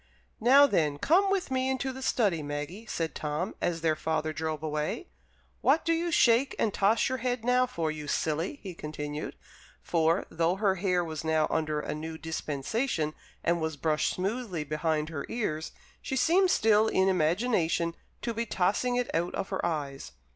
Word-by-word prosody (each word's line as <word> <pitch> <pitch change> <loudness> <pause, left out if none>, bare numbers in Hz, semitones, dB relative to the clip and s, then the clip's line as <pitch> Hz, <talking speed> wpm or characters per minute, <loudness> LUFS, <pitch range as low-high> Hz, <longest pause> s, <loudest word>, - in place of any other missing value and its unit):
"Now, 270 +5 +7
then, 155 - +1
come 370 - +3
with 390 -7 0
me 260 0 +1
into 265 0 -1
the 265 - -8
study, 205 -10 +1
Maggie," 150 +9 -5
said 165 -5 -2
Tom, 150 +6 -3
as 170 -2 -1
their 160 -1 +2
father 155 0 -1
drove 155 -1 -3
away. 155 - -2 0.5
"What 325 - +3
do 330 - +3
you 340 +1 -1
shake 260 -3 +4
and 215 - +1
toss 205 +3 +3
your 260 0 -2
head 245 -1 -2
now 250 +1 +3
for, 165 -10 -2
you 150 -1 -7
silly?" 160 - -1
he 190 -3 -6
continued; 150 -1 -5 0.5
for, 165 +1 +2
though 165 +2 +1
her 195 -1 +2
hair 180 -1 +1
was 160 -2 -5
now 160 -1 +2
under 155 -1 0
a - - -3
new 160 +1 -6
dispensation, 160 - -2 0.3
and 170 0 +1
was 160 -2 -2
brushed 155 +1 +1
smoothly 195 -3 -2
behind 155 +1 -1
her 150 -4 -4
ears, 165 -9 -2 0.3
she 265 - -3
seemed 350 +8 +4
still 220 - +4
in 190 -3 +2
imagination 170 -1 +1 0.3
to 235 - -1
be 230 +1 -2
tossing 205 +7 +1
it 245 0 -1
out 170 +2 0
of 190 - -3
her 190 - -2
eyes. 145 -5 -3
175 Hz, 175 wpm, -29 LUFS, 155-235 Hz, 0.5 s, Now